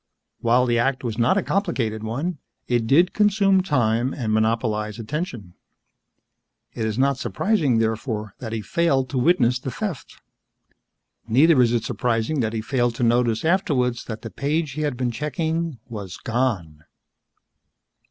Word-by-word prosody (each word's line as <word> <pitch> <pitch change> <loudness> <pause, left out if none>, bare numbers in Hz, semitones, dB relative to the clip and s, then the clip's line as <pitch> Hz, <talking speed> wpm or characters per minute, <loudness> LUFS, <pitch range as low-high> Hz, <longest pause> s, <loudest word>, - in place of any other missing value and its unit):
While 120 +2 +3
the 120 -1 +1
act 130 +2 0
was 115 -2 -3
not 125 +11 +3
a 200 - +1
complicated 115 - -1
one, 140 +9 -3 0.3
it 120 -2 +1
did 170 +8 +4
consume 200 -2 +3
time 125 - +1
and 110 -5 -2
monopolize 110 -1 0
attention. 120 - -5 1.2
It 110 - -3
is 110 0 -3
not 135 0 +2
surprising, 140 - +1
therefore, 110 -2 -2
that 115 -3 -6
he 115 -1 -3
failed 135 - +1
to 130 - 0
witness 125 -4 +3
the 130 - -5
theft. 190 - -6 1.1
Neither 135 +5 +5
is 120 -2 +3
it 120 -2 0
surprising 120 +5 -1
that 110 -3 0
he 110 - -2
failed 120 0 0
to 120 - -2
notice 120 +1 +2
afterwards 140 -9 +1
that 110 -1 -7
the 115 - -6
page 150 +1 -1
he 150 +4 -4
had 145 -5 -1
been 125 -1 -1
checking 160 +4 -2
was 100 -7 -7
gone. 105 -11 -2
125 Hz, 150 wpm, -23 LUFS, 115-150 Hz, 1.2 s, Neither